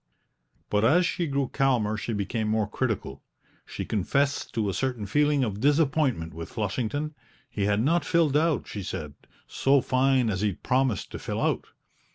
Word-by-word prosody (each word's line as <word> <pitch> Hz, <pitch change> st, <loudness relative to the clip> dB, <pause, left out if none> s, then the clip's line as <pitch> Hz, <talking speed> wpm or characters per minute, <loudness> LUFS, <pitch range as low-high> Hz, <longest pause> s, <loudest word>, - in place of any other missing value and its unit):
But 105 Hz, 0 st, +2 dB
as 165 Hz, +10 st, +5 dB
she 170 Hz, 0 st, -1 dB
grew 140 Hz, -2 st, 0 dB
calmer 125 Hz, -6 st, +1 dB
she 105 Hz, +3 st, -4 dB
became 105 Hz, +1 st, -2 dB
more 110 Hz, -1 st, +1 dB
critical; 105 Hz, -, -3 dB, 0.5 s
she -, -, -5 dB
confessed 140 Hz, +8 st, 0 dB
to 110 Hz, -2 st, 0 dB
a 100 Hz, -, -1 dB
certain 125 Hz, 0 st, -2 dB
feeling 145 Hz, +5 st, +2 dB
of 105 Hz, -4 st, -2 dB
disappointment 140 Hz, -, +1 dB
with 80 Hz, +1 st, -7 dB
Flushington; 125 Hz, +8 st, -2 dB, 0.4 s
he 100 Hz, -, -1 dB
had 105 Hz, +2 st, +2 dB
not 165 Hz, +4 st, +2 dB
filled 160 Hz, -2 st, +2 dB
out, 155 Hz, -2 st, +2 dB
she 105 Hz, -, -5 dB
said, 75 Hz, -6 st, -5 dB, 0.3 s
"so 135 Hz, +1 st, +2 dB
fine 130 Hz, -2 st, +2 dB
as 95 Hz, -1 st, -2 dB
he'd 105 Hz, -3 st, -2 dB
promised 130 Hz, -5 st, 0 dB
to -, -, -6 dB
fill -, -, -4 dB
out." -, -, 0 dB
125 Hz, 170 wpm, -26 LUFS, 105-140 Hz, 0.5 s, as